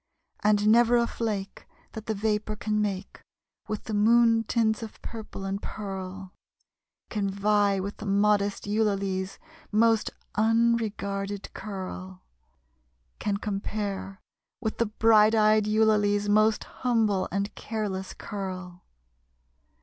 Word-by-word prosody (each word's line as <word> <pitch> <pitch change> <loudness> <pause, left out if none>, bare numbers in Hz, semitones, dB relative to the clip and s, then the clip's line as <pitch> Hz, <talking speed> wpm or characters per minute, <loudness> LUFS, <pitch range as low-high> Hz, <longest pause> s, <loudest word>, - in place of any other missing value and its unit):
And 210 0 +3
never 240 +2 +5
a 235 - +3
flake 210 -4 -4 0.2
That 220 -1 -8
the 220 - -1
vapor 215 +1 -1
can 210 0 -1
make 195 -2 -3 0.5
With 215 -1 -4
the 220 - -5
moon 225 +2 +4
tints 220 -1 +1
of 225 -2 -8
purple 220 -3 -7
and 195 +1 -3
pearl, 190 -2 -6 0.8
Can 205 -2 -1
vie 200 0 +2
with 200 +2 -4
the 215 - -7
modest 200 0 +2
Eulalie's 200 -3 -1 0.3
most 225 +1 +3 0.2
unregarded 215 -3 0
curl 185 -2 -7 1.0
Can 200 -1 -1
compare 200 -1 -4 0.4
with 220 -3 -3
the 230 - +2
bright 215 0 +5
eyed 215 -1 +4
Eulalie's 210 -1 +3
most 215 +1 +3
humble 225 -6 0
and 200 +2 -2
careless 200 -4 -4
curl. 185 -3 -6
210 Hz, 115 wpm, -27 LUFS, 195-220 Hz, 1.0 s, never